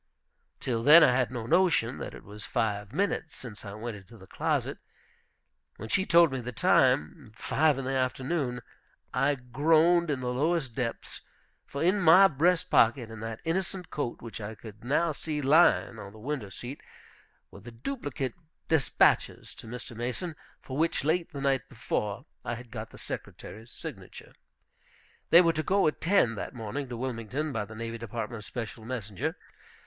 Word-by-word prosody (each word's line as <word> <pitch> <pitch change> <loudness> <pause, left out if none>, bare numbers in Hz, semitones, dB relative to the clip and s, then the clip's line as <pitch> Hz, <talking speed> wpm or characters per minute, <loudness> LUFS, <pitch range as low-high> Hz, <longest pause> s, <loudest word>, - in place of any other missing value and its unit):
Till 115 -3 -1
then 150 +7 +9
I - - +6
had 125 0 +2
no 120 -3 -5
notion 135 -5 +2
that - - -6
it - - -12
was 105 +1 -11
five 105 -2 -1
minutes 160 0 -1
since 115 -5 -9
I 100 -2 -7
went 110 +1 -5
into 100 +4 -15
the 95 - -14
closet. - - -1 1.0
When 110 - -7
she 190 - +1
told 170 -2 +6
me 130 -1 -3
the 125 +1 -5
time, 80 -4 +2
five 150 +4 +2
in 135 - -4
the 135 - -1
afternoon, 130 0 -1 0.5
I 145 +2 +2
groaned 160 +7 +3
in 140 -3 0
the 125 -1 -2
lowest 145 -1 0
depths. 120 -2 -4 0.5
For, 140 - -3
in 185 +4 +3
my 180 +2 +8
breast 180 +3 +1
pocket 115 0 +4
in 110 - -8
that 115 0 -6
innocent 180 +1 -2
coat, 125 -6 -4
which 115 -1 -7
I 105 +2 -6
could 110 0 -12
now 150 +6 +2
see 150 0 -4
lying 145 -5 +4
on 100 -1 -9
the - - -13
window 125 -2 -4
seat, 125 +8 -8 0.7
were - - -12
the 120 - -10
duplicate 135 - -4 0.4
despatches 160 -5 +2
to - - -12
Mr. 120 0 -8
Mason, 125 +9 -4 0.3
for 130 - -6
which, 165 -3 +1
late 165 +3 0
the 140 -3 -6
night 135 -1 0
before, 110 -1 -3 0.2
I 120 - -3
had 120 0 -11
got 115 -2 -6
the - - -14
Secretary's 110 +3 -8
signature. - - -9 1.0
They 170 - +9
were 165 -2 +3
to 155 - -1
go 195 +5 +2
at 155 - 0
ten 170 - +3
that 100 - -5
morning 125 +4 -4
to 120 - -5
Wilmington, 130 +4 -3
by 105 - -2
the 110 +2 -11
Navy 115 +1 -5
Department's 115 -1 -5
special 115 -2 -6
messenger. 110 -5 -4
125 Hz, 175 wpm, -29 LUFS, 115-155 Hz, 1.0 s, then